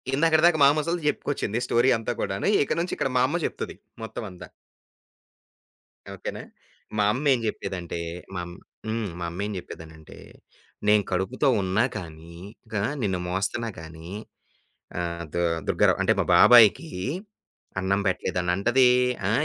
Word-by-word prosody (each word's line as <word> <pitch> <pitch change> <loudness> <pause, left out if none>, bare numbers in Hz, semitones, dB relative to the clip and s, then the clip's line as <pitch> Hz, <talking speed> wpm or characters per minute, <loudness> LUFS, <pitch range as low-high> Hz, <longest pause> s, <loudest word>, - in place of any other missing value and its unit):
ఇందాకడి 160 +2 +3
దాకా 175 -2 +5
మాా 140 - +8
ముసలిది 165 +1 -2
జెప్పుకొచ్చింది 120 -7 -1
స్టోరీ 120 +2 +3
అంతా 115 +2 -3
కూడాను. 100 - -2 0.2
ఇక - - -1
నుంచి 175 +2 -2
ఇక్కడ 135 - 0
మా 125 - +4
అమ్మ 165 +6 -1
జెప్తది - - -4 0.3
మొత్తమంతా. 105 -4 -7 1.7
ఓకేనా! - - -6 0.6
మా 105 - +3
అమ్మ 140 +4 -4
ఏం 125 - 0
జెప్పేదంటే 90 -5 -4 0.4
మంమ్ 90 -1 -5 0.3
హ్మ్. 110 -2 -2
మా 85 - -3
అమ్మ 90 +3 -5
ఏం 105 - -4
చెప్పేదనంటే 80 -3 -11 0.7
నేను 105 0 +5
కడుపుతో 95 +10 0
ఉన్నా 95 +5 +1
కానీ 85 -2 -10 0.4
గా 105 - 0 0.2
నిన్ను 95 -4 0
మోస్తున్నా 95 +6 -2
గానీ 80 +1 -10 0.9
ఆహ్, 85 -1 -3
దు-దుర్గరావు 85 -2 +1
అంటే - - +3
మా - - +1
బాబాయికి 120 +7 +7 0.9
అన్నం 95 +2 +1
పెట్టలేదన్నంటది, 95 +8 +2 0.4
ఆ! - - +1
100 Hz, 130 wpm, -25 LUFS, 90-125 Hz, 1.7 s, మాా